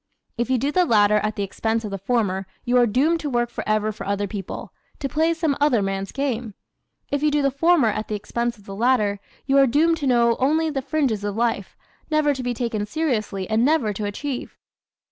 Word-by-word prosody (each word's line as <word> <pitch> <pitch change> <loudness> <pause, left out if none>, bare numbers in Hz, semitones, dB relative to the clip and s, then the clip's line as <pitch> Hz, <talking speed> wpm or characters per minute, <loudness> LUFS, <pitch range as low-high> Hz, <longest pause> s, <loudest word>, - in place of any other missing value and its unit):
If 240 +1 -2
you 260 - +3
do 275 +5 0
the 365 +3 +3
latter 210 -7 +4
at 215 0 -1
the 200 - -2
expense 220 +3 -2
of 210 - -5
the 195 - -4
former 195 -3 0 0.2
you 245 - +1
are 245 -1 +5
doomed 290 +10 +2
to 300 - -3
work 240 -2 0
forever 215 0 -1
for 215 - -8
other 200 0 0
people, 195 -2 -6 0.2
to 275 - -3
play 315 +5 +1
some 320 -4 0
other 250 -8 +3
man's 195 0 -3
game. 245 -6 -3 0.6
If 285 0 0
you 300 - +3
do 295 -1 +1
the 275 - +2
former 305 -3 +3
at 215 +1 -3
the 215 - -2
expense 235 +3 -3
of 205 - -20
the 195 - -8
latter 215 -3 +2 0.3
you 275 0 +4
are 275 - +6
doomed 325 +6 +3
to 290 -3 -2
know 235 -2 +3
only 310 +4 +2
the 275 -2 -2
fringes 270 -7 -1
of 205 -1 -2
life, 230 -4 -1 0.3
never 305 -2 +2
to 265 - -5
be 245 -1 -2
taken 220 -3 -2
seriously 215 - -2
and 220 +2 +2
never 270 -7 +2
to 205 +1 -4
achieve. 250 +6 -5
240 Hz, 220 wpm, -23 LUFS, 210-285 Hz, 0.6 s, are